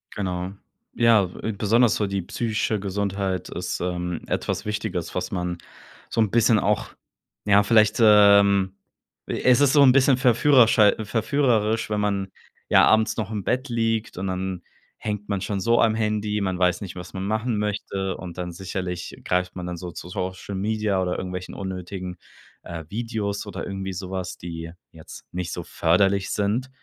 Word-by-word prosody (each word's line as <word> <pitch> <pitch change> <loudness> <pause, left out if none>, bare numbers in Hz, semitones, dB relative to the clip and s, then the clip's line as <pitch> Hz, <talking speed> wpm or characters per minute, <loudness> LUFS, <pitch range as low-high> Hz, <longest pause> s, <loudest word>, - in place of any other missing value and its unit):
Genau. 90 -2 -3 0.4
Ja, 115 -5 +4
so 90 - -12 0.2
besonders 115 +3 +3
so 105 - 0
die 95 -1 -2
psychische 110 +1 -1
Gesundheit 95 -2 -2
ist, - - -4
ähm, 90 -1 -3
etwas - - -2
Wichtiges, 105 -5 -3
was 90 0 -3
man 90 -2 -2 0.5
so 115 - 0
'n 105 - +1
bisschen 115 -2 +4
auch 105 +1 0 0.6
ja, 100 0 +5
vielleicht, 110 0 +4
ähm, 100 -3 +6 0.5
es 125 +1 +3
ist 140 -2 +4
so 145 - +6
'n 130 - +7
bisschen 135 0 +4
verführerschei 120 -4 +5
verführerisch, 115 -1 +1
wenn 105 -1 0
man, 100 -2 0 0.4
ja, - - +6
abends 110 0 +3
noch 110 -1 -3
im 105 -3 -3
Bett 130 +2 -1
liegt 115 -2 -1
und 95 +1 -3
dann 95 -1 -3 0.3
hängt 105 -1 -5
man 100 -2 0
schon 100 0 -2
so 115 +4 +3
am 110 -1 +4
Handy, 105 -1 -1
man 95 -2 -1
weiß 90 +1 +2
nicht, 95 - -7
was 90 0 -9
man 95 - -4
machen 110 +1 -1
möchte 100 -2 -3
und 90 -2 -9
dann 90 -1 -4
sicherlich 90 -1 -5
greift 90 0 -1
man 90 -1 -5
dann 90 -1 -5
so 90 0 -7
zu 90 +1 -9
Social 95 +2 -5
Media 105 0 0
oder 90 -1 -1
irgendwelchen 90 -1 -5
unnötigen, 90 -1 -6 0.5
äh, 85 -1 -7
Videos 110 -2 -3
oder 95 -3 -5
irgendwie 95 -1 -5
so 90 +1 -6
was, 95 -1 -4
die 80 -1 -7 0.2
jetzt 80 -1 -12
nicht 90 -1 -4
so 85 - -5
förderlich 95 +5 +1
sind. 110 +6 -1
100 Hz, 170 wpm, -24 LUFS, 90-110 Hz, 0.6 s, n